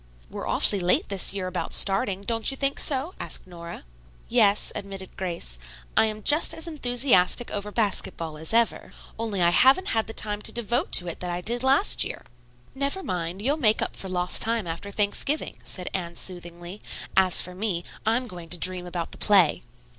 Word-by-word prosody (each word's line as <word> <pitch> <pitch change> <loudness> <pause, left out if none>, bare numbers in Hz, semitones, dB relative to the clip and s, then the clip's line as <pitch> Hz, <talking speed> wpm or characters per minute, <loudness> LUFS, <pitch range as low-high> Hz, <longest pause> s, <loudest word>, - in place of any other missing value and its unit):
"We're - - -6
awfully 200 - +3
late 180 0 +1
this 195 -2 +2
year 195 -2 -3
about 185 0 -4
starting. 195 0 +1
Don't 225 +1 +3
you 270 - -1
think 275 0 -1
so?" 285 +5 +2
asked - - -3
Nora. 170 -2 -10 0.5
"Yes," 200 0 +4
admitted 195 -2 -7
Grace. 170 - -4 0.4
"I 220 - +4
am 215 -1 -5
just 300 +2 +5
as 325 - -2
enthusiastic 245 - +1
over 205 0 -4
basketball 190 -7 -2
as 160 - -3
ever, 230 0 0 0.3
only 210 -5 -1
I 170 - +4
haven't 270 - +4
had 225 -1 0
the 225 - -6
time 210 -1 -3
to - - +2
devote 240 - 0
to 180 - +6
it 170 - -6
that 180 - -4
I 175 0 -3
did 235 +6 -1
last 270 +9 +3
year." - - -5 0.5
"Never 280 +8 -2
mind, 180 - -4
you'll 285 +5 +1
make 220 -7 +2
up - - -5
for 190 - -6
lost 180 -1 0
time 225 -2 +2
after 170 +4 -5
Thanksgiving," 210 +9 0
said 180 -1 -4
Anne 170 -3 -4
soothingly. 175 +2 -6 0.3
"As 185 -2 +4
for 180 - -8
me, 185 -3 -2 0.2
I'm 230 +3 0
going 175 -5 -10
to 175 - +1
dream 180 +1 -2
about 175 -2 -5
the - - -9
play." 190 -7 +4
200 Hz, 190 wpm, -25 LUFS, 180-235 Hz, 0.5 s, to